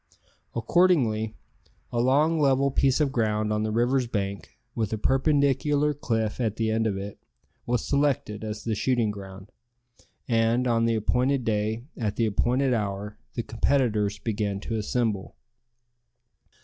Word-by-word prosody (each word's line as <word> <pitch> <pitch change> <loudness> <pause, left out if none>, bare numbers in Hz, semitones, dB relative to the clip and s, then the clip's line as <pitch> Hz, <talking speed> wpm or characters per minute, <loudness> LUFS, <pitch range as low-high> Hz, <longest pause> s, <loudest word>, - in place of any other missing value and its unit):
Accordingly, 115 -5 +2 0.6
a 120 - -1
long 150 +6 +3
level 140 -1 +3
piece 135 0 +2
of 145 -3 +2
ground 110 -3 0
on 105 - 0
the 110 - -1
river's 120 +3 +1
bank, 100 -3 -4 0.2
with 110 -3 -2
a 110 - -1
perpendicular 140 +3 +2
cliff 115 -6 -2
at 110 -3 0
the 110 -1 0
end 110 0 +1
of 100 -3 -1
it, 100 +1 -7 0.5
was 120 -1 0
selected 140 -7 0
as 105 -1 -5
the 115 - -1
shooting 115 0 +1
ground, 95 -1 -10 0.8
and, 115 +1 +2
on 115 -2 +2
the 115 0 +2
appointed 125 +4 +1
day, 110 +1 -1
at 105 -4 -2
the 115 - +1
appointed 125 +5 +1
hour, 105 -2 -3 0.2
the 115 - -2
competitors 110 -4 +1
began 100 -2 -2
to 115 - -4
assemble. 110 -2 -1
115 Hz, 145 wpm, -26 LUFS, 105-130 Hz, 0.8 s, long